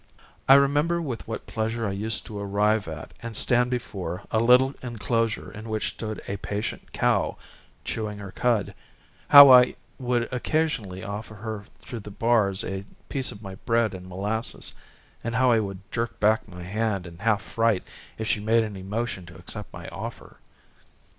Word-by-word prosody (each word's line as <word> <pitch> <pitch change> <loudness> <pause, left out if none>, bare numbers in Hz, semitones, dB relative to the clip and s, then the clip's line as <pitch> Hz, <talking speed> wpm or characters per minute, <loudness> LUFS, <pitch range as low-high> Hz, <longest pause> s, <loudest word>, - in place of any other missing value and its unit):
I 135 - +11
remember 145 +5 +3
with 135 -9 -5
what 115 - -5
pleasure 115 0 -2
I - - -1
used 105 +3 -2
to 105 -2 -6
arrive 100 +1 +1
at, 80 -2 -7
and 115 -1 -6
stand 125 0 +3
before, 95 -8 -4
a 110 - +2
little 125 +4 +5
enclosure 115 -2 -1
in 110 +1 -9
which 110 -1 -1
stood 110 -1 -6
a 100 - -3
patient 105 +2 -4
cow - - +1 0.5
chewing 105 -2 -3
her 100 -2 -8
cud, 115 +1 +1 0.5
how 140 -1 +11
I 125 -1 +7 0.2
would 120 -2 0
occasionally 125 -9 -1
offer 105 +2 -6
her 110 -1 -6 0.2
through 120 - -7
the 105 - -9
bars 105 -3 +2
a 95 0 -4 0.3
piece 135 -2 0
of 100 - -11
my 95 -1 -7
bread 115 -2 +2
and 90 -1 -8
molasses, 105 +5 -3 0.5
and 115 0 -2
how 125 +1 +4
I 115 - +5
would 100 -3 -4
jerk 115 0 -3
back 110 +1 +3
my 90 -2 -9
hand 100 0 -1
in 85 -1 -11
half 105 -1 +1
fright 115 -4 +1 0.3
if 110 - -3
she 110 - +1
made 110 +2 +3
any 105 -3 -6
motion 100 -2 -3
to 85 -2 -12
accept 100 +4 -6
my - - -9
offer. - - -8
110 Hz, 175 wpm, -26 LUFS, 100-120 Hz, 0.5 s, I